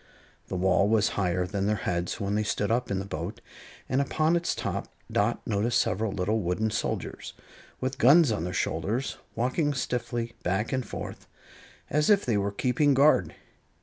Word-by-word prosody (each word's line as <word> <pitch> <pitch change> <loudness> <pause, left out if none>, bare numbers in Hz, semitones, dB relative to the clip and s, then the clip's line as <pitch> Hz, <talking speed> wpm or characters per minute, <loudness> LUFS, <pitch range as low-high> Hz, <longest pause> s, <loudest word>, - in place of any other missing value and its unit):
The - - -4
wall 95 +2 +3
was 110 -1 +3
higher 90 -2 0
than 100 +1 -2
their 105 - +2
heads 85 +3 -1
when 100 -1 -1
they 105 - +1
stood 105 0 -1
up 125 +2 0
in 100 - 0
the 95 - -3
boat, 90 +3 -5 0.5
and 130 +2 +1
upon 155 +4 +1
its 170 0 0
top - - -3 0.2
Dot - - 0
noticed 115 +4 +1
several 110 +1 0
little 100 +4 0
wooden 105 +4 -1
soldiers, - - -3 0.5
with 130 +1 -3
guns 145 +2 +6
on 105 -6 -1
their 90 - -3
shoulders, 110 +7 -1 0.2
walking 140 +5 0
stiffly 120 -2 -2
back 95 +7 -1
and 130 -1 0
forth, - - -7 0.6
as 150 +1 +1
if 205 -2 +4
they 120 -4 +1
were 100 0 0
keeping 130 +7 +2
guard. 135 - +4
110 Hz, 175 wpm, -27 LUFS, 100-130 Hz, 0.6 s, guns